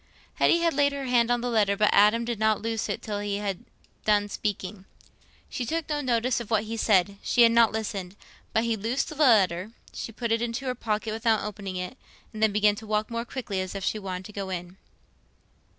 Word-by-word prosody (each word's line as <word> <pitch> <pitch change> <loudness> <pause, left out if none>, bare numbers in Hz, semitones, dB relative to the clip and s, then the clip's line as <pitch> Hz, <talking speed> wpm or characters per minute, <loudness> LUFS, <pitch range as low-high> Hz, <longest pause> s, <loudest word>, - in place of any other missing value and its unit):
Hetty 340 - +4
had 335 -1 +2
laid 285 0 +2
her 280 -1 -4
hand 240 -2 +3
on 245 -1 +1
the 245 - -2
letter, 205 -3 +2
but 210 0 +3
Adam 210 +3 +5
did 235 -2 -3
not 220 -1 +2
loose 225 0 -2
it - - -3
till 210 -2 -3
he 205 -1 -2
had 200 -3 -3 0.4
done 205 -1 +2
speaking. 195 -2 -4 0.6
She 250 - -4
took 325 +6 -2
no 295 -1 -1
notice 245 -2 +1
of 235 -3 -7
what 220 -2 +2
he 225 +1 -5
said—she 200 +2 +3
had 230 - +6
not 230 -1 +5
listened; 200 -4 -4 0.4
but 220 - +2
when 230 0 -1
he - - +2
loosed 225 +6 -1
the 310 - -8
letter, 210 - +3 0.2
she - - -6
put 230 +1 -4
it 225 0 +2
into 240 +3 -3
her 255 - 0
pocket, 220 -2 -2
without 225 -1 +1
opening 200 -2 -5
it, 180 +7 -5 0.3
and 215 - -7
then 220 -1 +4
began 210 0 +3
to 220 - -9
walk 215 +2 -1
more 230 0 -2
quickly, 225 -7 -4
as 185 +1 -5
if 195 - -4
she 215 - -1
wanted 185 -2 -5
to 210 - -10
go 195 -1 -4
in. 180 0 -6
220 Hz, 225 wpm, -26 LUFS, 200-235 Hz, 0.6 s, had